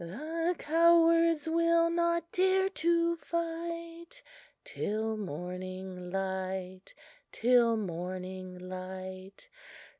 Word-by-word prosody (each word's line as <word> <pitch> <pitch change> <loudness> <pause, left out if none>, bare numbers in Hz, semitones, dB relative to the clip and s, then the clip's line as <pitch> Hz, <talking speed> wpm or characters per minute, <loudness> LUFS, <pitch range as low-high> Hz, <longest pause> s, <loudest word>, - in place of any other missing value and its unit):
The 320 - -2
cowards 330 0 +4
will 335 +1 +3
not 340 0 0
dare 380 +1 +3
to 340 -1 +1
fight 335 +5 -5 0.4
Till 220 +1 -2
morning 180 0 -6
break 190 - -4 0.4
till 235 -1 +4
morning 185 0 -5
break. 185 - -8
250 Hz, 80 wpm, -31 LUFS, -, 0.4 s, cowards